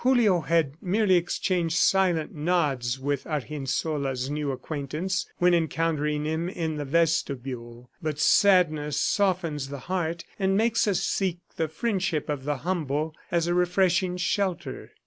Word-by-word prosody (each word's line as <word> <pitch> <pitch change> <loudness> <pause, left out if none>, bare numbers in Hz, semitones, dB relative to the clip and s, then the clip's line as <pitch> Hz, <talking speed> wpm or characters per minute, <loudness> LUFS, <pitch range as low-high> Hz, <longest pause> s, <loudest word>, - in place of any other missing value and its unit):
Julio 235 -9 +4
had 160 -4 +1
merely 195 +1 +2
exchanged 175 -1 +1
silent 180 -4 +2
nods 145 -7 0
with 140 0 -2
Argensola's 140 -2 -2
new 150 -1 -2
acquaintance 155 +7 -3
when 180 0 +4
encountering 150 -2 0
him 160 +3 -1
in 160 -4 -3
the 145 - -3
vestibule; 130 -6 -1
but 155 -3 -2
sadness 155 -4 +3
softens 170 -8 0
the 140 - -5
heart 170 -2 -1 0.2
and 195 0 +2
makes 230 +1 +2
us 195 -2 +1
seek 185 -3 0 0.2
the 160 - 0
friendship 185 -3 -1
of 140 -3 -3
the 145 -1 -1
humble 155 -3 -1 0.2
as 170 -1 +1
a 175 - 0
refreshing 180 0 +2
shelter. 180 0 -2
165 Hz, 135 wpm, -26 LUFS, 145-180 Hz, 0.2 s, Julio